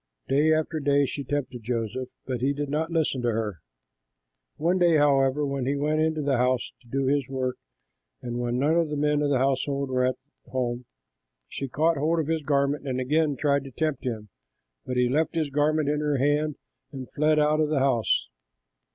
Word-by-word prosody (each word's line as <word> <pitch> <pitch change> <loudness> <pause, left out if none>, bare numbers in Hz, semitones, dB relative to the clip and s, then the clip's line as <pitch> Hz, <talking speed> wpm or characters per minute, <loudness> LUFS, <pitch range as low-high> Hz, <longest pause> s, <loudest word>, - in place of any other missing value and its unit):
Day 150 +4 +3
after 155 0 0
day 140 -1 +3
she 140 +2 -4
tempted 135 -3 -3
Joseph, 120 +2 -3 0.2
but 125 -2 -3
he 135 +2 +2
did 145 0 -4
not 160 +2 -1
listen 160 -6 0
to 120 - +1
her. 110 -6 -2 1.0
One 175 +4 +1
day, 170 -3 +5
however, 140 0 +3
when 140 -2 -2
he 140 - +1
went 150 +2 0
into 160 -1 0
the 140 -2 +1
house 125 0 +1
to 120 - -23
do 135 +3 -1
his 140 -1 +1
work 130 -1 -2 0.6
and 120 0 -5
when 120 0 -1
none 145 +5 +2
of 165 -2 +1
the 150 - -3
men 150 0 +1
of 145 - +1
the 140 - +3
household 135 +1 0
were 130 0 +1
at 130 - 0 0.3
home, 125 0 -2 0.6
she 135 - -5
caught 155 +5 +1
hold 160 +4 +1
of 160 - 0
his 160 +1 -1
garment 140 0 0
and 130 -1 -1
again 150 +3 +1
tried 140 +1 +1
to - - -7
tempt 155 0 -2
him, 110 -4 -4 0.6
but 125 - -2
he 125 0 +3
left 155 +7 0
his 155 -3 -1
garment 150 +1 +1
in 150 0 +1
her 150 -2 0
hand 145 +2 +1 0.4
and 130 -2 -8
fled 155 +1 +2
out 150 0 +3
of 155 -1 +2
the 155 - +1
house. 130 - +2
140 Hz, 205 wpm, -26 LUFS, 130-150 Hz, 1.0 s, day